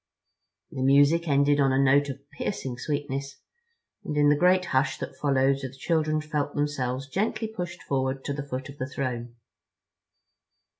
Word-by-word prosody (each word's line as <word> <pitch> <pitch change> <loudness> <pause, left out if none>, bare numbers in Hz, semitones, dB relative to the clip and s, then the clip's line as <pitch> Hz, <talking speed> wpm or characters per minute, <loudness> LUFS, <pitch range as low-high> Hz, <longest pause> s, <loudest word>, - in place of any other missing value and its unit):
The 130 - -5
music 145 +5 +4
ended 145 0 +3
on 135 -1 +4
a 130 - +2
note 140 +1 +4
of 140 +1 -8
piercing 135 -5 -4
sweetness 140 -1 -3 0.7
and 150 - -4
in 145 0 +5
the 145 - +5
great 180 +3 +3
hush 135 -2 +1
that - - -6
followed 135 -1 +2
the 130 -2 -5
children 155 0 0
felt 150 -1 -3
themselves 135 -2 -1
gently 215 - -1
pushed 180 -5 -6
forward 135 0 -1
to 140 - -2
the 145 - -4
foot 130 -1 -4
of 145 0 -12
the 130 - -3
throne. 120 -3 -4
140 Hz, 160 wpm, -26 LUFS, 135-150 Hz, 0.7 s, in